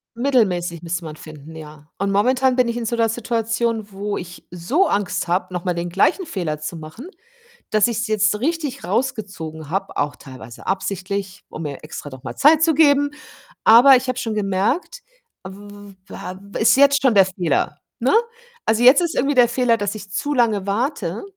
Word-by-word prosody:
Mittelmäßig 190 - 0
müsste 170 0 -4
man 155 -1 -7
finden, 155 0 -12
ja. 150 -1 -12
Und 195 0 -1
momentan 255 +5 +2
bin 250 -2 +2
ich 235 +1 -2
in 235 - -4
so 235 - -1
'ner 230 -1 +1
Situation, 225 -1 -2
wo 200 +1 -4
ich 175 0 -9
so 240 - +1
Angst 200 -3 -1
habe, 180 +2 -1
noch 180 +1 -4
mal 180 - +1
den 170 +1 -4
gleichen 245 - +1
Fehler 155 -6 -3
zu 155 +3 -6
machen, 160 - -10 0.6
dass 215 +1 +3
ich's 225 -1 -2
jetzt 210 -1 +1
richtig 290 -1 -2
rausgezogen 190 - -4
habe, 195 +2 -3
auch 145 0 -1
teilweise 120 -4 -12
absichtlich, 195 0 -3
um 155 - -8
mir 145 -3 -6
extra 145 - -8
noch 130 0 -12
mal 120 -1 -7
Zeit 310 +2 +5
zu 325 -1 +3
geben. 285 -1 +4 0.5
Aber 250 +4 +8
ich 255 +1 -5
habe 255 0 -2
schon 225 -3 -3
gemerkt, 210 - -1 0.4
w 190 - -8
w 205 0 -13
war 185 +1 -8 0.2
ist 225 - +5
jetzt 280 +1 +4
schon 260 -4 +4
der 195 -2 +6
Fehler, 180 -5 -1 0.2
ne? 250 - +1 0.5
Also, 220 +2 +1
jetzt 260 +8 +7
ist 340 -1 -1
irgendwie 275 +2 +1
der 245 -1 +6
Fehler, 240 -1 +1
dass 205 0 -2
ich 210 -2 -10
zu 290 +8 -2
lange 220 -6 +1
warte, 210 - -2
205 Hz, 190 wpm, -20 LUFS, 175-250 Hz, 0.6 s, Aber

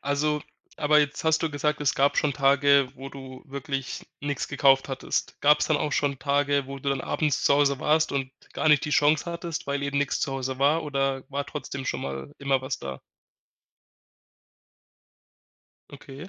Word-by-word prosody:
Also, 145 +1 0 0.3
aber 150 0 +4
jetzt 150 +1 -2
hast 160 0 +2
du 160 - 0
gesagt, 150 +1 -1
es 145 - +1
gab 140 +2 +2
schon 150 - +2
Tage, 140 0 +4
wo 135 +1 -8
du 130 -1 -10
wirklich 135 -1 -5
nix 145 -2 -3
gekauft 135 -1 +3
hattest. 135 -1 -3
Gab's 150 +1 +4
dann 155 - +2
auch 150 0 -2
schon 140 -2 0
Tage, 140 0 +1
wo 135 0 -7
du 140 - -3
dann 135 -1 -1
abends 150 -1 -1
zu - - +5
Hause 140 -1 +2
warst 155 0 +2
und 135 -2 -2 0.2
gar 155 - 0
nicht 150 -2 +5
die 150 - -3
Chance 150 +3 +3
hattest, 170 -1 -5
weil 140 0 -2
eben 140 0 -1
nix 145 -2 0
zu 135 - -1
Hause 130 -1 -3
war? 145 +4 +3
Oder 135 -2 -1
war 140 +1 -3
trotzdem 140 -2 -6
schon - - -2
mal 70 - -6
immer 140 -1 +1
was 130 0 -4
da? 65 -1 -7 2.9
Okay. 140 +3 -11
140 Hz, 180 wpm, -26 LUFS, 135-150 Hz, 2.9 s, zu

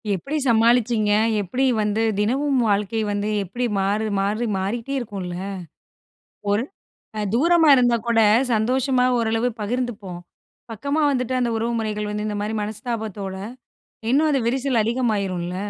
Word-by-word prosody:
எப்படி 275 - -4
சமாளிச்சீங்க? 230 -2 +3 0.3
எப்படி 250 +8 -1 0.2
வந்து 210 +1 0 0.2
தினமும் 265 +5 +1
வாழ்க்கை 205 +2 0
வந்து 205 +1 -1
எப்படி 240 +7 -3
மாறு 200 +3 0
மாறி 210 +4 0
மாறிகிட்டே 230 +7 -3
இருக்குல்ல. 195 -6 -5 1.2
ஒரு 205 +3 +2 0.6
அ - - -1
தூரமா 330 +4 +4
இருந்தா 245 -2 +3
கூட 230 -1 +3 0.3
சந்தோஷமா 250 +3 +2
ஓரளவு 225 +1 +1
பகிர்ந்துப்போம். 210 -5 -4 0.5
பக்கமா 280 +7 -2
வந்துட்டு 255 -1 -1
அந்த 240 -1 +1
உறவுமுறைகள் 220 -2 -2
வந்து 210 0 -3
இந்த 210 - -3
மாதிரி 210 +2 -2
மனஸ்தாபத்தோட 215 -3 -4 0.8
இன்னு 290 +4 +3
அந்த 275 -2 +2
விரிசல் 255 0 +1
அதிகமாகிறும்ல. 200 -7 -1
225 Hz, 120 wpm, -22 LUFS, 205-250 Hz, 1.2 s, தூரமா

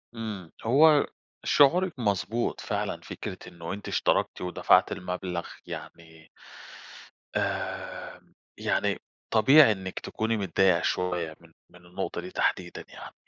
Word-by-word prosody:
إمم، 105 -7 -6
هو 145 +5 +6 0.4
شعورِك 175 +5 +4
مضبوط 110 +2 -1
فعلًا، - - -3
فكرة 95 - -6
إنه 85 -1 -7
أنت 100 - -7
اشتركتِ - - +1
ودفعتِ 90 0 +3
المبلغ 90 -1 -4 0.2
يعني 80 -1 -10 1.1
امم، - - -4 0.2
يعني - - 0 0.3
طبيعي 135 +3 +7
إنِك 95 -2 -5
تكوني 110 +1 -2
متضايقة 95 -2 +2
شوية 90 -3 -1
من 85 -1 -19 0.2
من 90 0 -18
النقطة 90 - -4
دي - - -8
تحديدًا 90 -1 -1
يعني. - - -11
95 Hz, 115 wpm, -27 LUFS, 85-110 Hz, 1.1 s, طبيعي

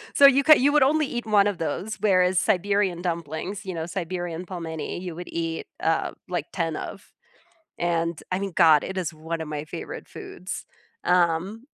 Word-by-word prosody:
So 280 - +8
you 275 +1 +5
c 310 - +10
you 285 +3 +3
would 300 -3 +6
only 305 +2 +3
eat 240 -3 -4
1 205 -2 +4
of 200 -4 -1
those, 180 +7 -3
whereas 185 -3 +3
Siberian 200 -3 +1
dumplings, 170 +4 -4
you 185 - -4
know, 160 -1 -3
Siberian 175 -1 -4
pelmeni, 170 -2 -5
you 175 -3 -6
would 175 - -7
eat, 165 -1 -3 0.2
uh, 165 - +1 0.2
like, 180 - -2
10 165 -3 -1
of, 200 - -7 0.7
and 170 -1 -1
I 185 - 0
mean, 195 -2 -4
god, 160 -4 +6
it 190 - -5
is 170 -3 -2
1 160 +1 -5
of 160 - -5
my 150 0 -4
favorite - - -7
foods. 385 - -7 0.4
Um, 180 +6 +1
180 Hz, 185 wpm, -25 LUFS, 165-205 Hz, 0.7 s, c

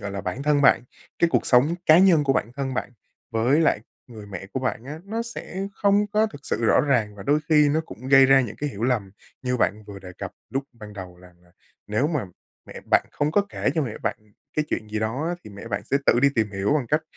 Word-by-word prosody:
gọi 100 - -5
là, 100 - -4
bản 135 - -4
thân 145 -1 +2
bạn, - - +5 0.4
cái 170 - +3
cuộc - - +1
sống 135 +7 +4
cá 155 +2 +8
nhân 175 -6 +5
của 135 - +3
bản 120 -3 -1
thân 135 -2 -3
bạn - - -3 0.4
với 125 +8 +2
lại 155 - +2 0.3
người 110 -4 -11
mẹ 95 -1 -7
của 130 - -2
bạn 125 -2 -2
á, 150 +4 -7
nó 225 +3 -3
sẽ 195 -4 -6
không 205 +1 +2
có 215 +2 +2
thực 170 -10 -10
sự 115 - -2
rõ - - +5
ràng 120 -8 +1
và 100 - -10
đôi 145 +7 +2
khi 150 -2 +5
nó 155 +2 +1
cũng 130 +4 -9
gây 135 0 +7
ra 135 0 +6
những 115 -4 -4
cái 150 - -3
hiểu 110 -6 -7
lầm 115 -6 0 0.3
như 125 -1 0
bạn 105 -2 0
vừa 100 -1 -9
đề 90 -1 -11
cập - - -6 0.2
lúc 135 +1 -2
ban 105 -3 -11
đầu 95 -3 -9
rằng 90 -1 -19
là 90 - -25 0.4
nếu 110 +7 +1
mà 150 -8 -1 0.4
mẹ - - -9
bạn - - +4
không 145 +1 -1
có 200 +3 +2
kể - - -1
cho 160 - +1
mẹ 120 -6 -5
bạn - - -2 0.4
cái 155 - +2
chuyện 110 - -3
gì 110 - -2
đó 115 +8 -2
á, 175 - -1
thì 105 - -10
mẹ 100 +3 -10
bạn 100 -3 -2
sẽ 140 - +1
tự 120 - +4
đi 140 - +5
tìm 110 -3 +1
hiểu 100 +4 0
bằng 135 -6 0
cách, 150 +4 +1
130 Hz, 260 wpm, -24 LUFS, 105-150 Hz, 0.4 s, cá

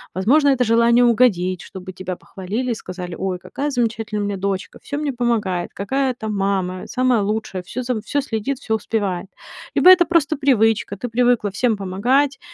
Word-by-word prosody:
Возможно, 275 +11 +3
это 260 -2 +3
желание 235 +1 +4
угодить, 210 -7 +2
чтобы 185 0 -9
тебя 185 0 -5
похвалили 210 +9 -4
и - - -1
сказали: 180 -3 -7
"Ой, 190 -1 -2
какая 280 +10 -4
замечательная 225 -4 -1
у - - -1
меня 200 -1 -3
дочка, 190 0 -3
всё 285 - -5
мне 295 -1 -1
помогает, 225 -8 -1
какая-то 250 +1 -2
мама, 195 -3 -1
самая 255 -3 +1
лучшая, 205 -2 -3
всё, 240 +8 -5
всё 250 +3 -2
следит, 255 +1 -3
всё 220 -5 -1
успевает". 200 -4 -2 0.5
Либо 365 - +6
это 365 -1 +8
просто 315 -3 +1
привычка, 225 -7 +2
ты 245 +5 -5
привыкла 240 -3 +2
всем 225 +3 +1
помогать, 240 +9 0
225 Hz, 170 wpm, -20 LUFS, 195-255 Hz, 0.5 s, это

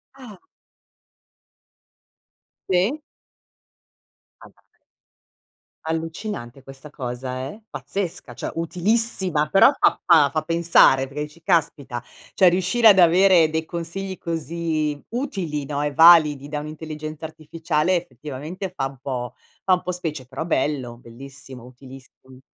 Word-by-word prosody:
Ah. 250 -7 -12 2.3
Sì. 195 +12 +1 1.4
Ma - - -12
dai. - - -32 1.1
Allucinante 160 - -5
questa 135 +2 -12
cosa 130 0 -5
eh, 215 +8 -13
pazzesca, 175 -9 -5
cioè - - -5
utilissima, 180 -2 +1
però 195 - +6
fa - - +3
fa 155 -4 +5
fa 155 - -1
pensare 165 -5 +4
perché 145 +2 -5
dici: 150 +3 -12
"Caspita, 150 - -1 0.3
cioè 185 -2 +6
riuscire 190 +6 +2
ad 190 -2 +6
avere 175 -1 +5
dei 160 0 -2
consigli 175 +3 -5
così 160 -2 -3
utili, 190 - -4
no 145 0 -3
e 150 - -1
validi 155 -3 +6
da 150 0 -3
un'intelligenza 155 0 -7
artificiale 160 +2 -2
effettivamente 155 +5 -8
fa 135 - -2
un 135 0 -13
po' 125 -3 -4 0.3
fa 190 - +3
un 180 - +1
po' 180 - -4
specie", 160 -7 -5
però 140 +5 -5
bello, 130 -6 -2
bellissimo, 125 +1 -12
utilissimo. 130 0 -15
155 Hz, 120 wpm, -22 LUFS, 135-175 Hz, 2.3 s, però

